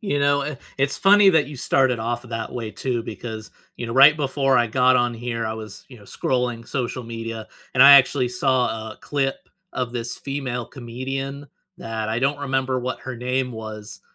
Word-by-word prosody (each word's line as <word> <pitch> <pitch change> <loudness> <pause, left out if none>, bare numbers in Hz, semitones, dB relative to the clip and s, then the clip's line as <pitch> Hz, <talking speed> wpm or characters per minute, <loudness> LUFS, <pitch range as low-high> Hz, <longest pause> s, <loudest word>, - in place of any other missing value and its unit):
You 200 -10 -1
know, 140 0 +2
i 145 -2 -5 0.2
it's 135 +1 +1
funny 200 0 +6
that 160 -5 +3
you 145 0 -9
started 130 -1 +2
off 120 +2 -3
that 115 -2 -5
way, 115 -3 -5
too, 120 0 -3
because, 110 -2 -7 0.3
you 120 - -5
know, 115 - -4
right 140 +3 +8
before 135 -2 +1
I 120 - +3
got 130 +2 +3
on 120 -1 +1
here, 115 -1 -3
I 110 - -3
was, 110 -2 -9
you 130 - -13
know, - - -17
scrolling 120 +1 -2
social 125 -1 -3
media, 115 -1 -6 0.3
and - - +6
I 140 +1 +10
actually 130 -2 +4
saw 125 -3 0
a - - -10
clip 135 -2 -2 0.2
of 125 -2 -3
this 120 -1 -4
female 130 -4 -4
comedian, 135 +3 -6 0.3
that 110 -7 -4
I 115 +2 -1
don't 140 +2 +1
remember 130 -2 -1
what 125 +1 -4
her 130 -2 -6
name 125 +2 -1
was, 110 -2 -8
125 Hz, 195 wpm, -22 LUFS, 115-135 Hz, 0.3 s, I